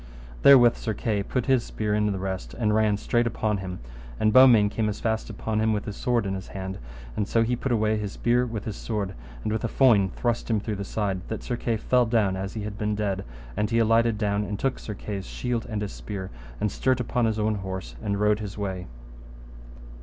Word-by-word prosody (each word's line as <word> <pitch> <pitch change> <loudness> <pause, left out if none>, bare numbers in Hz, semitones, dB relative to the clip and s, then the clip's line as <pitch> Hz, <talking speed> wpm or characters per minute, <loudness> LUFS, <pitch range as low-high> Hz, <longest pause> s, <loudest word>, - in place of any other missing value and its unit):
Therewith 125 -4 +7
Sir 110 -3 -3
Kay 105 -3 -1
put 125 +4 -2
his 130 -3 +3
spear 105 -1 -2
in 105 0 +2
the 100 - -2
rest, 95 0 -4
and 110 -3 +1
ran 105 -1 +3
straight 120 +3 +1
upon 110 -2 0
him; 95 -2 -5 0.4
and 110 0 +3
Beaumains 115 -5 +7
came 110 -1 0
as 105 - -4
fast 110 -1 -1
upon 110 0 -2
him 110 0 +2
with 105 - -2
his 105 - -5
sword 120 -4 0
in 95 - -1
his 95 -1 -5
hand, 95 0 -6 0.4
and 105 - -1
so 115 - +3
he 120 +2 0
put 130 +2 -3
away 110 -2 +2
his 105 -1 -4
spear 120 +1 +2
with 110 -3 -5
his 110 - -4
sword, 105 -4 -3 0.3
and - - -1
with 110 - -2
a - - +1
foin 110 -6 +4
thrust 120 +5 -2
him 110 -2 +2
through 105 0 -4
the 100 - -3
side, 100 -2 -2
that 110 - -5
Sir 120 - -2
Kay 115 -1 -1
fell 125 +2 +2
down 110 -5 +2
as 95 +2 -5
he 110 - -3
had 105 0 -6
been 105 0 0
dead; 100 -2 -1 0.3
and 105 - 0
he 115 - +1
alighted 115 0 +3
down 105 -1 0
and 105 0 -4
took 135 +4 -1
Sir 105 - -6
Kay's 100 -1 -5
shield 125 -2 -3
and 105 -2 -2
his 100 - -5
spear, 95 -3 -6 0.3
and 105 - 0
stert 130 +2 +1
upon 125 0 0
his 110 -1 0
own 110 0 +1
horse 95 -10 -6
and 100 -1 -1
rode 105 0 +3
his 105 -2 -6
way. 95 -3 -4
105 Hz, 235 wpm, -26 LUFS, 100-115 Hz, 0.4 s, Therewith